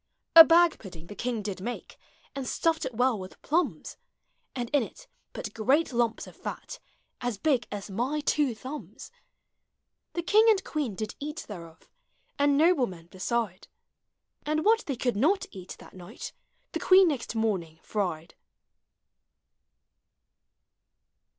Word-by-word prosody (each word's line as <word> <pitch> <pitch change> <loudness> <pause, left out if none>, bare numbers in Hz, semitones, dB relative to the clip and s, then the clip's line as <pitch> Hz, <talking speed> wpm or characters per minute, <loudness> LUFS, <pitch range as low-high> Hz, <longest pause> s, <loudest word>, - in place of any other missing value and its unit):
A 325 - +14
bag 335 0 +4
pudding 175 -5 -11
the 205 - -10
king 240 -2 -2
did 195 -2 -5
make, 240 +5 -6 0.4
And 270 -2 -4
stuffed 325 -2 0
it 255 -3 -5
well 245 -2 +2
with 185 0 -10
plums; 340 +4 -1 0.6
And 245 -2 -2
in 290 -2 +4
it - - -8 0.3
put 210 - -6
great 270 +7 +2
lumps 235 -1 0
of - - -13
fat, - - -7 0.4
As 245 -4 -2
big 260 +1 +1
as 205 0 -6
my 250 +9 -1
two 290 -4 +1
thumbs. 265 +7 -9 1.0
The 345 - -2
king 425 +5 +5
and 405 -3 +3
queen 285 -10 -3
did 215 +2 -4
eat 300 +3 -5
thereof, 165 -5 -10 0.5
And 285 0 +4
noblemen 250 - +2
beside; 195 0 -2 0.8
And 310 +1 -1
what 450 +2 +3
they 275 - -1
could 245 -1 -1
not 345 - +2
eat 185 -1 -9
that - - -15
night, 180 -1 -9 0.4
The - - -3
queen 375 0 +6
next 260 -5 -3
morning 185 -8 -1
fried. 175 -6 -3
245 Hz, 140 wpm, -28 LUFS, 205-305 Hz, 1.0 s, A